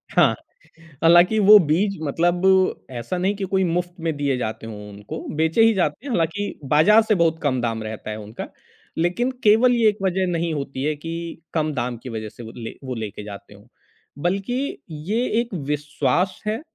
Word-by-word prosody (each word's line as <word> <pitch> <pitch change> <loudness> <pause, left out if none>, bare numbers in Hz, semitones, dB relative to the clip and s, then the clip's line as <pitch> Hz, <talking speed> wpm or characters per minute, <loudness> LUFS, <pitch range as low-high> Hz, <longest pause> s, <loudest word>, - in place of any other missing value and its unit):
हाँ, - - +5 0.7
हालाँकि 175 +6 +6
वो 210 +1 +9
बीज 195 +6 +1
मतलब 175 +5 +1 0.5
ऐसा 120 +10 -4
नहीं 190 +3 0
कि 200 - -5
कोई 190 0 +3
मुफ़्त 175 0 -1
में 165 -2 -1
दिए 140 -2 0
जाते 110 -2 -4
हों 105 -2 -8
उनको, 100 +1 -8 0.2
बेचे 160 +7 +2
ही 225 0 +5
जाते 180 - -1
हैं। 280 - -4
हालाँकि 175 +2 -1
बाज़ार 155 +11 +5
से 215 -1 +2
बहुत 165 -2 +2
कम 130 -4 +1
दाम 115 -2 -2
रहता 110 0 -6
है 105 - -5
उनका। 105 +1 -7 0.5
लेकिन 180 +10 0
केवल 225 +4 +5
ये 230 -2 +4
एक 210 - -3
वज़ह 190 0 +1
नहीं 170 -1 -1
होती 140 -2 -4
है 150 +1 0
कि 165 +2 -6
कम 155 -2 0
दाम 125 -2 -2
की 130 - -6
वजह 110 -2 -5
से 120 - -12
वो 110 - -9
ले 115 -2 -7
वो 130 -1 -4
लेके 110 -2 -6
जाते 100 0 -10
हों। 100 +1 -17 0.6
बल्कि 200 +10 -1 0.3
ये 230 +4 +1 0.2
एक 235 -2 -7 0.2
विश्वास 150 +4 0
है 215 +1 0
अ, - - -10
165 Hz, 195 wpm, -22 LUFS, 125-195 Hz, 0.7 s, वो